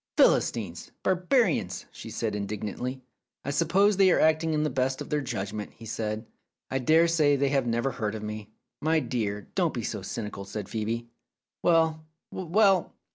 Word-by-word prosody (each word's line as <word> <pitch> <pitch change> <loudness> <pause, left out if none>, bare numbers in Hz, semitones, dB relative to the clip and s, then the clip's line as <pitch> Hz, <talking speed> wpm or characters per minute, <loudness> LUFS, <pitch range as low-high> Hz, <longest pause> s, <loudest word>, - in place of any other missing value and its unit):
"Philistines! - - +2
Barbarians!" 190 +7 +1
she - - -9
said 110 -2 -2
indig 105 0 -4
nantly. 125 +5 -4 0.4
"I 140 - -1
suppose 185 +7 +3
they 195 -1 +6
are - - +4
acting 160 +1 +3
to - - +1
the 150 -1 +1
best 130 +1 0
of - - -7
their 150 -1 +1
judgment," 105 -4 -4
said 110 -1 -3
he. 130 - -13
"I - - +2
dare 160 +6 +5
say 155 -4 +3
they 140 0 +1
have 135 -3 +1
never 120 +3 0
heard 110 -4 -3
of 110 - -6
me." 105 0 -6 0.3
"My 160 +1 +3
dear, 105 -8 -3
don't - - +1
be - - -3
so - - -3
cynical," 105 -3 -5
said 100 +1 -5
Phcebe. 115 +3 -3 0.6
"Well, 160 -2 +3 0.3
well! 190 +1 +2
135 Hz, 175 wpm, -27 LUFS, 110-160 Hz, 0.6 s, they